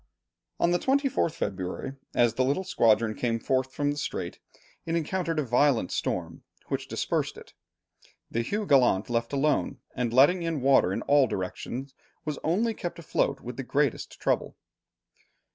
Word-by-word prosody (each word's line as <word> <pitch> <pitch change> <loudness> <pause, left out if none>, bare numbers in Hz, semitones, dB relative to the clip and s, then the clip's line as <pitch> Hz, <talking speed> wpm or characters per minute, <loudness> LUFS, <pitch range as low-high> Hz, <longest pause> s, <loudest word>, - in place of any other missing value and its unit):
On 170 - +3
the 175 - +2
24th 270 - +1
February, 95 - -4 0.2
as 120 -2 +4
the 130 - +1
little 140 +8 +1
squadron 115 - +3
came 115 0 -1
forth 130 +3 0
from 145 +2 0
the 145 - -4
strait, - - -4 0.4
it 165 - -2
encountered 170 0 -1
a 150 - +2
violent 125 -4 +2
storm, - - -2 0.3
which - - -2
dispersed - - -1
it. - - -13 0.8
The 115 - 0
Hugh 205 - -2
Gallant, 125 - +3
left 115 0 0
alone, 145 +1 +1 0.2
and 125 -2 -1
letting 145 +9 +5
in 165 -4 -2
water 135 -8 +4
in - - -2
all 140 -2 +4
directions, 120 +7 -5 0.3
was 150 -2 -3
only 215 +9 +1
kept 175 -5 -5
afloat 140 -4 -1
with 125 0 -7
the 135 - -3
greatest 140 0 -1
trouble. - - -1
135 Hz, 160 wpm, -27 LUFS, 120-165 Hz, 0.8 s, letting